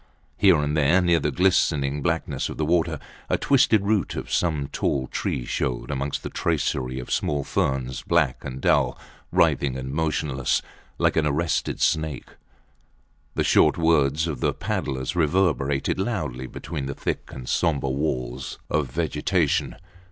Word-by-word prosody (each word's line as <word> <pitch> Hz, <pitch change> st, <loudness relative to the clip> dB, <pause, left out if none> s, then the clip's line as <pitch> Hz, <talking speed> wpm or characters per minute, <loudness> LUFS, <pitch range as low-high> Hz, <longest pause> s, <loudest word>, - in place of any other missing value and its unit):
Here -, -, +5 dB
and 75 Hz, 0 st, 0 dB
there, 75 Hz, +4 st, +4 dB
near 85 Hz, -2 st, +3 dB
the 75 Hz, 0 st, 0 dB
glistening 75 Hz, -4 st, +2 dB
blackness -, -, -1 dB
of -, -, -7 dB
the 80 Hz, -, 0 dB
water, 85 Hz, +1 st, +1 dB, 0.3 s
a -, -, +2 dB
twisted 120 Hz, -7 st, +3 dB
root 105 Hz, -1 st, 0 dB
of -, -, -5 dB
some 75 Hz, -5 st, +1 dB
tall 70 Hz, -1 st, -1 dB
tree 60 Hz, -1 st, -3 dB
showed 60 Hz, +4 st, -2 dB
amongst 70 Hz, 0 st, -2 dB
the -, -, -4 dB
tracery 65 Hz, -1 st, -1 dB
of 60 Hz, -, -6 dB
small 70 Hz, -1 st, 0 dB
ferns, 65 Hz, -2 st, -1 dB
black 80 Hz, -7 st, +1 dB
and 65 Hz, 0 st, -6 dB
dull, -, -, +2 dB, 0.3 s
writhing 65 Hz, -2 st, +2 dB
and 65 Hz, 0 st, -5 dB
motionless, 75 Hz, -4 st, 0 dB, 0.3 s
like -, -, +2 dB
an 75 Hz, -1 st, +3 dB
arrested 80 Hz, +3 st, 0 dB
snake. 80 Hz, -4 st, 0 dB, 1.1 s
The -, -, +1 dB
short -, -, +4 dB
words 80 Hz, -2 st, +3 dB
of 75 Hz, -6 st, -3 dB
the -, -, +1 dB
paddlers 65 Hz, +4 st, -3 dB
reverberated 80 Hz, -4 st, +1 dB
loudly 75 Hz, -, -2 dB
between 70 Hz, 0 st, -5 dB
the 70 Hz, -, -4 dB
thick -, -, -3 dB
and 65 Hz, -2 st, -8 dB
sombre 70 Hz, -6 st, +1 dB
walls 65 Hz, -3 st, -3 dB
of 75 Hz, -4 st, +1 dB
vegetation. 80 Hz, +2 st, 0 dB
75 Hz, 150 wpm, -24 LUFS, 65-80 Hz, 1.1 s, Here